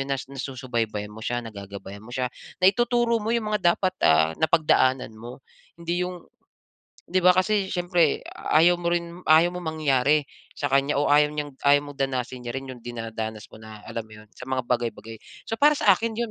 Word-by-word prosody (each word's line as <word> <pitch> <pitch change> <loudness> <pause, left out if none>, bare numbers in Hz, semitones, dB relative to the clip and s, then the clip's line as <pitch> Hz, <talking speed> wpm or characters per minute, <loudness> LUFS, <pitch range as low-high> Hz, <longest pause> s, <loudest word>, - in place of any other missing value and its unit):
yun 135 0 -2
na 135 - -1
nasusubaybayan 125 -6 -4
mo 110 - -11
siya 120 0 -1
nagagabayan 100 -2 -9
mo 120 - -12
siya. 130 -1 -1 0.3
Naituturo 235 +4 +3
mo 220 - -2
yung 220 -2 -1
mga 175 -5 +3
dapat, 185 - 0 0.2
ah, 80 0 +4
napagdaanan 145 -6 +2
mo. 120 +4 -10 0.4
Hindi 170 +1 -2
yung 180 -2 -8 0.8
di 185 +1 +1
ba, 180 - +7
kasi 200 +1 +1
siyempre 175 -3 +1 0.3
ayaw 170 +3 +6
mo 170 0 -1
rin 170 +1 -3
ayaw 160 +3 +6
mong 180 -2 -5
mangyari 145 0 +2 0.3
sa 145 - -3
kanya 140 +1 +2
o 145 - +1
ayaw 150 0 +5
niyang 145 -1 -4
ayaw 145 0 +5
mong 145 - -13
danasin 130 -1 -3
niya 120 - -4
rin 135 0 -6
yung 125 -2 -11
dinadanas 115 -2 -6
mo - - -12
na, 110 -1 -11
alam 115 - -4
mo 110 - -24
yun, - - -19
sa - - -14
mga 130 -1 -1
bagay-bagay. 115 -2 -2 0.3
So, - - -1
para 295 +1 +5
sa 200 - +6
akin 225 +3 -4
yun 235 -1 -2
140 Hz, 195 wpm, -25 LUFS, 120-175 Hz, 0.8 s, ba